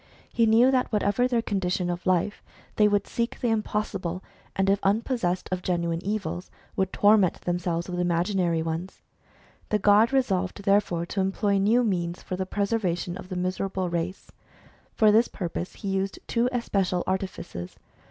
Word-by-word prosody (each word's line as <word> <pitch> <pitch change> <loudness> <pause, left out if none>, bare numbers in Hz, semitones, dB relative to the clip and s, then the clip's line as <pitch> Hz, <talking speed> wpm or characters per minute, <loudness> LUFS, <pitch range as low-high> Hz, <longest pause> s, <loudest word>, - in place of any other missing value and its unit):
He 230 -1 +3
knew 235 +4 +5
that 255 -2 +1
whatever 210 +3 +2
their 240 -2 0
condition 185 -3 -1
of 175 +1 -5
life, 185 +3 +1 0.4
they 210 - +6
would 205 -1 +1
seek 235 0 -3
the 240 - 0
impossible, 205 -5 -2 0.3
and 195 0 +1
if 195 0 +3
unpossessed 200 -3 0
of 185 -1 -1
genuine 170 -1 -1
evils, 200 -3 -3 0.3
would 190 0 0
torment 205 -3 +4
themselves 175 -1 -2
with 180 -1 -4
imaginary 175 -1 +1
ones. 165 +3 -5 0.7
The 210 - +2
god 210 +4 +5
resolved 200 -7 0
therefore 195 -4 +2
to 195 +3 -2
employ 195 +1 +1
new 225 +5 +3
means 175 -5 -2
for 185 - -4
the 185 0 -3
preservation 190 -4 -1
of 185 - -9
the 185 - -4
miserable 185 0 -2
race. 175 +2 -4 0.6
For 215 -1 +4
this 225 +3 +4
pur 180 -4 -5
pose 175 +2 -5
he 200 - -6
used 195 +1 -1
two 235 +1 +1
especial 195 -7 0
artifices. 185 - -4
195 Hz, 160 wpm, -26 LUFS, 180-210 Hz, 0.7 s, they